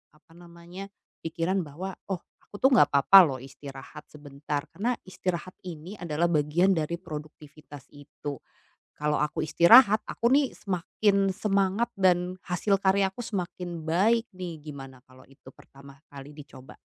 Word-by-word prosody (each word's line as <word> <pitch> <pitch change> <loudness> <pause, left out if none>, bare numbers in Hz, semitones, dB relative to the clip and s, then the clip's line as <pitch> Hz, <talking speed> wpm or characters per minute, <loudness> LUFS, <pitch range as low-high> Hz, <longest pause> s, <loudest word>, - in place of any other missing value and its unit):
apa 155 - -27
namanya 175 +2 -11 0.4
pikiran 170 +4 -1
bahwa, 180 +6 -7 0.2
"Oh 180 - -5 0.3
aku 205 - -8
tuh 265 - +6
nggak - - +7
apa-apa 140 +8 +7
loh 135 -4 -4
istirahat 135 0 -11
sebentar, 145 0 -5
karena 235 +6 -1
istirahat 185 -1 -4
ini 175 +3 -8
adalah 170 -1 -1
bagian 160 +4 +2
dari 160 +2 -2
produktivitas 150 -1 -11
itu. 145 0 -8 0.6
Kalau 150 0 0
aku 155 +1 -1
istirahat 215 +7 +6
aku 235 +2 0
nih 280 -2 +3
semakin 195 +1 0
semangat 200 +2 0
dan 180 -1 +2
hasil 195 +3 0
karyaku 195 +2 +1
semakin 175 -4 -5
baik 220 +8 +2
nih" 175 -4 -7
gimana 135 -3 -10
kalau 130 0 -18
itu 135 -1 -16
pertama 140 0 -17
kali 140 0 -11
dicoba? 140 -3 -13
170 Hz, 140 wpm, -27 LUFS, 150-190 Hz, 0.6 s, nggak